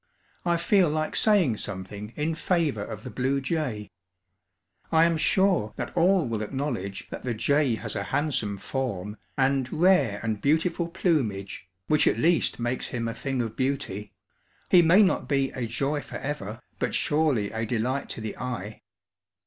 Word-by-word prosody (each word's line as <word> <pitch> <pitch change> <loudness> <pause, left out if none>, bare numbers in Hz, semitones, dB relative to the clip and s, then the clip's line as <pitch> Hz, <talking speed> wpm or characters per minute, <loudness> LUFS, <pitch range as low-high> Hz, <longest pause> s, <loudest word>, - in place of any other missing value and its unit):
I 170 0 +3
feel 180 0 +3
like 155 +1 -1
saying 185 - +3
something 100 +2 -6
in 155 +2 -1
favor 160 - 0
of 105 0 -7
the - - -7
blue 135 +2 0
jay. 135 -8 -3 1.0
I 160 0 +6
am 170 0 +2
sure 180 - +2
that - - -5
all 180 0 +4
will 115 -2 -2
acknowledge 110 -5 -3
that - - -6
the 120 -2 -2
jay 135 +2 +2
has - - -5
a 100 -1 -2
handsome 125 -9 -1
form 105 -4 -3 0.2
and 135 -1 +1
rare 155 - +3
and 110 -2 -2
beautiful 165 +3 +1
plumage, 125 - -1 0.2
which 150 - +3
at - - +3
least 170 +1 +2
makes 120 +2 -2
him 115 -2 -3
"a 115 - -2
thing 135 -1 -2
of 110 -1 -5
beauty;" 130 -7 -2 0.6
he 180 - +8
may 175 +6 +6
not 190 - +1
be 135 -2 +1
"a 125 -2 -3
joy 140 +6 -1
forever," 115 -9 -5 0.2
but - - -1
surely 145 -9 +1
a 110 +1 -3
delight 125 +4 -1
to - - -5
the 110 - -5
eye. 110 -5 -5
135 Hz, 165 wpm, -26 LUFS, 110-160 Hz, 1.0 s, he